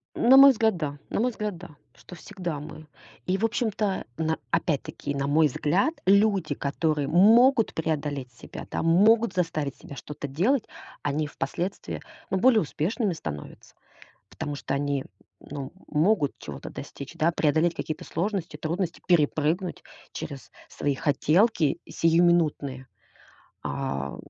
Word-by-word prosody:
На 260 +3 +6
мой 275 0 +10
взгляд, 220 -5 +1
да, 145 -3 -4
на - - -1
мой 250 +3 +2
взгляд, 210 -4 -4
да, 180 +1 -11 0.3
что - - -14
всегда 175 -4 -5
мы. 155 +1 -10 0.4
И, 185 +1 +1
в 225 - +2
общем-то, 215 -4 -1
на 160 0 0
опять-таки, 145 -2 -1
на 140 0 -1
мой 150 +2 +4
взгляд, 180 - 0
люди, 200 -5 +3
которые 145 +1 -1
могут 225 - +5
преодолеть 145 -5 -3
себя, 115 - -10
да, - - -2
могут 210 +6 +4
заставить 155 -6 -1
себя 140 - -11
что-то 145 +2 -7
делать, 205 - +1 0.4
они 145 +2 -1
впоследствии, 170 +6 -4 0.3
ну, 190 - 0
более 230 +1 +5
успешными 185 - -1
становятся, 75 - -8 0.6
потому 145 -1 -5
что 135 - -3
они, 140 -1 -1
м, - - -15 0.4
ну, 145 0 -6
м, - - -12
могут 155 0 +2
чего-то - - -8
достичь, 140 +4 -9
да, 170 0 +2
преодолеть 160 +1 +2
какие-то 155 - -4
сложности, 175 -2 -3
трудности, 170 +3 -3
перепрыгнуть 165 +2 +1 0.3
через 140 -3 -7 0.2
свои 145 -2 -2
хотелки 160 - +2
сиюминутные. 165 -6 +2 0.8
А, 70 - -3
165 Hz, 140 wpm, -26 LUFS, 145-195 Hz, 0.8 s, мой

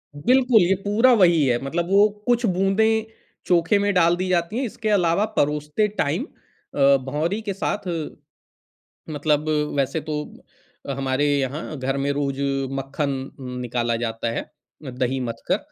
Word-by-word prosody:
बिल्कुल, 250 - +4
ये 180 +2 +3
पूरा 225 +5 +4
वही 170 -4 +5
है, 120 -2 +2
मतलब 165 +5 -2
वो 200 +2 +6 0.2
कुछ 240 0 +2
बूँदें 210 +3 +2 0.4
चोखे 175 +3 +3
में 205 0 +1
डाल 170 -1 +4
दी 185 +1 -3
जाती 175 +4 0
हैं। 265 - 0
इसके 220 -1 -4
अलावा 195 0 +2
परोसते 150 +7 +1
टाइम 165 - -1 0.5
अ, 140 -1 +5
भौंरी 160 +10 -2
के 205 -2 -3
साथ 195 +1 -3 1.2
मतलब 150 0 0 0.3
वैसे 140 +3 0
तो - - -1 0.8
हमारे 135 +1 -1
यहाँ 145 +3 -4
घर 135 +1 -2
में 140 +1 0
रोज़ 140 -1 -2 0.3
मक्खन 135 +2 -2 0.3
उम, 130 -2 -7
निकाला 120 -1 -1
जाता 115 0 -2
है, - - -3 0.5
दही 130 +1 -1
मथ 120 -2 -5
कर, - - +2
160 Hz, 150 wpm, -23 LUFS, 135-200 Hz, 1.2 s, वो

